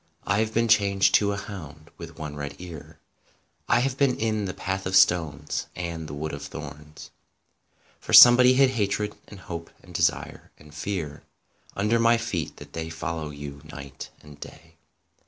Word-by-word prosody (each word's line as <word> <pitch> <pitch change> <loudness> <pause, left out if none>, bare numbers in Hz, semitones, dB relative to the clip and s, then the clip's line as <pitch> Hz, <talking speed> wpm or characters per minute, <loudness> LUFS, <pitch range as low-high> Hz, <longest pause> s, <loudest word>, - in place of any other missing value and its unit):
I 100 +1 +1
have 110 0 0
been 115 +1 +1
changed 100 -3 +3
to 100 -1 +4
a 100 - -3
hound 80 -7 -9
with 85 -2 -10
one 75 -2 -6
red 70 -1 -6
ear; 85 -4 -10 0.7
I 120 0 +4
have 135 0 -1
been 135 -3 +2
in 110 -2 -1
the 90 - -4
Path 95 0 -3
of 95 - -1
Stones 75 -4 +2
and 85 -2 -5
the 70 - -7
Wood 80 +1 -5
of 70 - -6
Thorns, 75 +1 -10 0.9
For - - -8
somebody 125 +1 +9
hid 135 0 +4
hatred 105 -2 -1
and 100 -3 -12
hope 85 -2 -7
and 90 - -15
desire 80 -1 -1
and 75 0 -17
fear 80 -3 -5 0.5
Under 105 +4 +1
my 115 0 +4
feet 100 - -4
that - - -13
they 80 -1 -5
follow 80 -1 -5
you 70 -1 -9
night 70 -3 -9
and 75 -1 -14
day. 80 +2 -13
85 Hz, 175 wpm, -25 LUFS, 75-105 Hz, 0.9 s, somebody